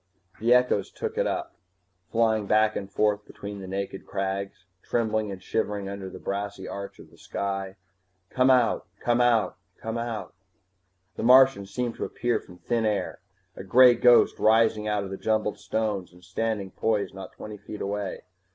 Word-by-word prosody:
The 115 +2 +1
echoes 125 -4 +3
took - - -5
it - - +1
up, - - -3 0.6
flying 110 -2 +1
back 110 +1 +3
and 100 -1 -5
forth 105 -1 +1
between 100 -1 -8
the 95 - -8
naked 95 0 -5
crags, 95 -1 -3 0.2
trembling 110 -2 0
and 95 -1 -6
shivering 105 -2 -2
under 100 -1 -6
the 95 - -9
brassy 100 0 -4
arch 100 0 -7
of - - -14
sky. 95 -1 -4 0.6
_Come 130 +1 +3
out, 125 -3 +2
come 120 0 +2
out, 120 -3 +2 0.2
come 115 +1 -4
out 115 -6 -4 0.8
_ - - -47
The - - -3
Martian 130 -4 +6
seemed 120 +3 -2
to - - -2
appear 120 0 -1
from 90 - -15
thin 115 +4 -1
air, 105 -2 -2 0.4
a - - -8
gray 125 +6 +7
ghost 120 0 +5
rising 110 -1 +3
out 105 -1 0
of 95 - -7
the 95 - -4
jumbled 110 -1 0
stones 105 -5 -2
and 90 0 -19
standing 100 +1 -2
poised 110 -3 -1
not 95 -1 -9
twenty 105 -1 -8
feet 105 - -9
away. 100 -1 -3
105 Hz, 170 wpm, -26 LUFS, 100-115 Hz, 0.8 s, gray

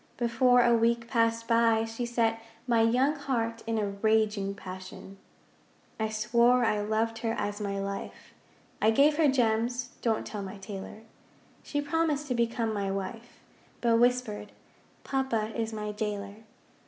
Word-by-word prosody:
Before 245 +1 +4
a 240 - +5
week 230 0 +2
passed 230 -1 +1
by 230 -1 +3
she 225 +2 -4
set 225 -1 0 0.2
My 235 -2 +3
young 250 +6 +3
heart 230 -5 -2
in 225 -1 0
a 210 -2 0
raging 210 -1 +1
passion. 185 +1 -9 0.8
I 220 0 0
swore 235 +3 +3
I 210 -2 +1
loved 220 +2 -1
her 225 -1 -1
as 205 -1 -3
my 200 -1 -2
life, 195 0 -6 0.5
I 215 - +5
gave 285 +6 +4
her 320 -2 +4
gems 245 -1 +1
(don't 225 -2 0
tell 210 - -5
my 195 +1 -7
tailor). 195 +2 -8 0.6
She 290 - -2
promised 300 -1 0
to - - +1
become 230 -1 0
my 200 -2 -2
wife, 195 +5 -6 0.4
But 230 -1 +3
whispered, 240 -4 +1 0.5
'Papa 235 -5 -1
is 225 -1 -2
my 210 -1 -4
jailer.' 205 -1 -4
225 Hz, 150 wpm, -29 LUFS, 210-240 Hz, 0.8 s, a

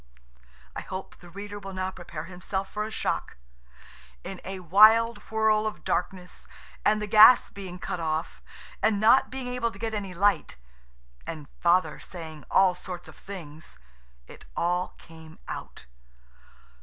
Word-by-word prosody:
I - - -4
hope 190 0 -8
the 175 - -14
reader 205 +3 -7
will 195 -1 -8
now 185 0 -2
prepare 170 -4 -8
himself 190 +2 -4
for 210 0 -2
a - - -5
shock. 220 - -3 0.9
In - - -7
a 190 0 -6
wild 215 +6 +6
whirl 220 -1 +2
of 215 - -6
darkness, 180 -2 -3 0.4
and 215 0 +3
the 210 - -2
gas 215 +4 +7
being 190 -3 -8
cut 180 - -4
off, 160 0 -3 0.4
and 215 -2 +2
not 225 +5 +5
being 265 -1 -5
able 250 -2 -1
to - - -12
get 225 -1 -3
any 200 -4 -4
light, 200 - +2 0.7
and 155 -3 -6
Father 170 -3 +2
saying 160 -4 -9
all 190 -1 +5
sorts 180 0 -8
of - - -13
things, 170 -5 -9 0.5
it - - -14
all 180 +1 0
came 160 -1 -14
out. - - -7
190 Hz, 150 wpm, -27 LUFS, 175-215 Hz, 0.9 s, gas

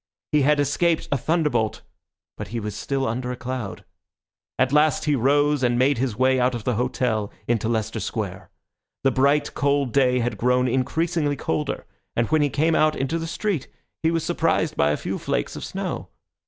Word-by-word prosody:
He 150 - +4
had 150 +2 +3
escaped 160 +4 +1
a 140 - +3
thunderbolt, 150 -8 0 0.5
but - - -6
he 115 +5 -4
was 105 -2 -5
still 135 +2 -2
under 125 +2 -2
a - - -3
cloud. 125 -4 -5 0.7
At 130 +1 +2
last 150 -1 +3
he 150 -1 +2
rose 145 +3 +2
and 120 -1 +2
made 130 0 +3
his 125 -4 -1
way 130 +2 +3
out 125 0 +2
of 115 - -5
the 125 - 0
hotel 115 -3 -1 0.2
into 115 -1 +1
Leicester 110 -1 -1
Square. - - -4 0.5
The 135 - +4
bright, 140 +3 +2
cold 140 -3 +1
day 130 -2 +3
had 120 -4 -1
grown 125 +1 +2
increasingly 145 +4 0
colder, 80 - -2 0.3
and 115 - +2
when 155 -1 +4
he 145 - +2
came 160 +4 +1
out 155 0 +3
into 135 +5 -1
the 165 - -4
street 175 -3 -2 0.3
he 160 - +2
was 165 -1 0
surprised - - 0
by 70 - +3
a 75 - +1
few - - -4
flakes - - -2
of - - -6
snow. - - -4
130 Hz, 190 wpm, -23 LUFS, 120-150 Hz, 0.7 s, He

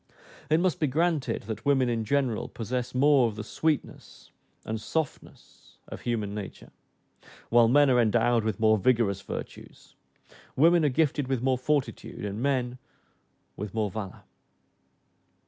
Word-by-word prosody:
It 155 +2 +4
must 180 -2 0
be 150 - +1
granted, 150 -4 0
that 110 +1 -6
women 135 -3 +2
in 115 -2 -1
general 130 -2 0
possess 125 +2 -4
more 140 -2 +4
of 110 - -5
the 105 - -6
sweetness 155 +6 -3 0.3
and 110 0 -4
softness 160 +6 -6
of - - -9
human 110 -4 -2
nature, 105 -2 -8 0.8
while 120 0 +5
men 145 +4 +5
are 125 -2 +4
endowed 115 +1 +2
with 110 0 -2
more 110 -1 +4
vigorous 105 -3 +1
virtues; - - -9 0.6
women 165 +4 +5
are 150 - +3
gifted 145 0 0
with 130 -2 -1
more 130 0 +2
fortitude, 140 -6 -2
and 100 +2 -4
men 125 -2 -1 0.8
with 105 0 -7
more 105 -3 -1
valor. 100 -2 -7
125 Hz, 145 wpm, -27 LUFS, 110-140 Hz, 0.8 s, while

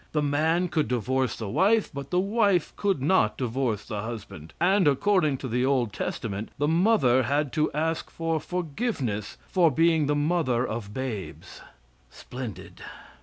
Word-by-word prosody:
The 150 -1 +1
man 160 +5 +1
could 155 -5 0
divorce 125 +1 0
the 110 - -5
wife, 205 - +2
but 140 0 -6
the 180 - +1
wife 200 -3 +1
could 195 -10 0
not 140 - +2
divorce 120 -4 -2
the 105 -2 -4
husband, 100 -9 -8
and 185 0 +3
according 155 0 +2
to 130 - -6
the 125 +1 0
old 130 -6 +1
testament, 105 +1 -4
the 145 - +1
mother 160 - +3
had 140 +3 0
to 155 -1 +1
ask 160 +2 -2
for 165 -1 -2
forgiveness 155 - -3
for 175 -3 +3
being 160 0 +2
the 150 - +1
mother 145 -5 +1
of 105 -6 -5
babes. 115 -5 -6 0.5
Splendid! 125 - -9
145 Hz, 155 wpm, -26 LUFS, 120-170 Hz, 0.5 s, and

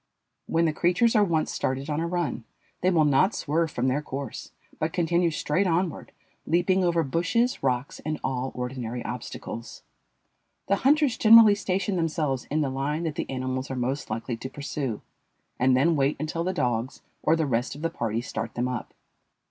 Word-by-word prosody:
When 165 +1 +2
the 160 - +1
creatures 180 +9 +2
are 210 - +6
once 165 -5 0
started 130 +2 -2
on 150 0 -1
a 165 - -1
run, 170 -8 -2 0.4
they 185 - +3
will 165 -4 +4
not 150 +9 +3
swerve 160 +2 0
from 130 -3 -1
their 135 +3 +1
course, 140 -3 -6 0.3
but 155 +2 -1
continue 175 0 +2
straight 155 +4 0
onward, 170 -1 -1 0.4
leaping 185 +3 +2
over 170 -2 +2
bushes, 180 - 0
rocks, 130 0 -1
and 155 0 -3
all 130 0 -2
ordinary 125 -1 -4
obstacles. 115 -1 -7 0.8
The 200 - +2
hunters 285 -1 +3
generally 225 -1 +8
station 195 -1 -1
themselves 155 -6 -1
in 155 +2 -1
the 140 -3 0
line 145 +5 -2
that 160 -2 -2
the - - -4
animals 130 0 -3
are 135 - -3
most 130 +3 -2
likely 115 +3 -3
to 130 - -6
pursue, 140 -5 -4 0.6
and 125 0 +4
then 165 +5 +3
wait 140 0 +1
until 160 +2 -2
the 185 - 0
dogs 125 -6 -2 0.2
or 160 - +3
the 160 -1 0
rest 125 -1 -1
of 145 - -9
the 165 - 0
party 115 -6 -2
start 115 -2 -5
them 120 +1 0
up. 125 -1 -5
150 Hz, 180 wpm, -26 LUFS, 130-175 Hz, 0.8 s, generally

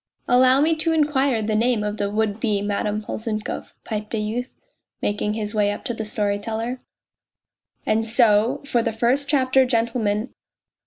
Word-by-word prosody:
" - - -47
Allow 255 +2 +5
me 320 +2 +3
to 325 +1 +1
inquire 280 -6 +1
the 215 0 -1
name 230 0 +2
of 210 0 -3
the 200 -1 -1
would 215 0 -1
be 210 -3 0
Madame 210 +1 -2
Polzunkov," 215 0 -5
piped 215 +1 -4
a - - -1
youth, 225 +4 -3 0.5
making 210 +1 -1
his 210 -1 -3
way 205 -1 +2
up 205 - -6
to 240 - +3
the 220 -1 -4
storyteller. 220 +4 -2 0.6
" - - -50
And 220 +1 +1
so 225 0 +3
for 245 -4 +1
the 230 0 -2
first 245 +6 +1
chapter, 265 -2 +3
gentlemen. 230 -2 -1
225 Hz, 170 wpm, -22 LUFS, 210-250 Hz, 0.6 s, Allow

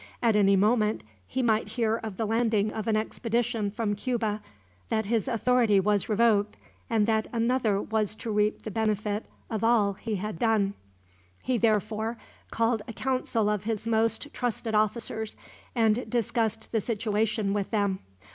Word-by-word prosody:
At 230 -3 +3
any 200 -1 +5
moment 215 - +2 0.2
he 260 - -1
might 220 -3 +2
hear 225 -1 +2
of 220 -4 -7
the 225 - 0
landing 220 -1 +1
of 220 -1 -4
an 220 - +2
expedition 225 0 -1
from 215 0 -1
Cuba, 215 -1 -1 0.5
that 220 -1 0
his 225 +2 0
authority 235 -3 +3
was 205 +1 +1
revoked, 210 -1 +2 0.3
and 220 -2 +3
that 220 0 +1
another 230 -3 +1
was 215 0 -1
to 225 +1 -5
reap 210 0 +1
the 215 - -5
benefit 215 -1 -1 0.2
of 220 0 -2
all 225 -4 +3
he 215 +2 -4
had 200 -3 -4
done. 215 -4 +2 0.7
He 250 -2 0
therefore 220 +1 +1 0.3
called 230 -1 +1
a 230 - -6
council 255 -4 0
of 210 -1 -1
his 225 -1 -2
most 230 +5 +1
trusted 235 -2 -2
officers, 215 0 0 0.4
and 225 +1 +2
discussed 225 -2 -1
the 225 - +1
situation 215 -1 0
with 205 -2 -1
them. 200 -3 0
220 Hz, 155 wpm, -27 LUFS, 210-230 Hz, 0.7 s, any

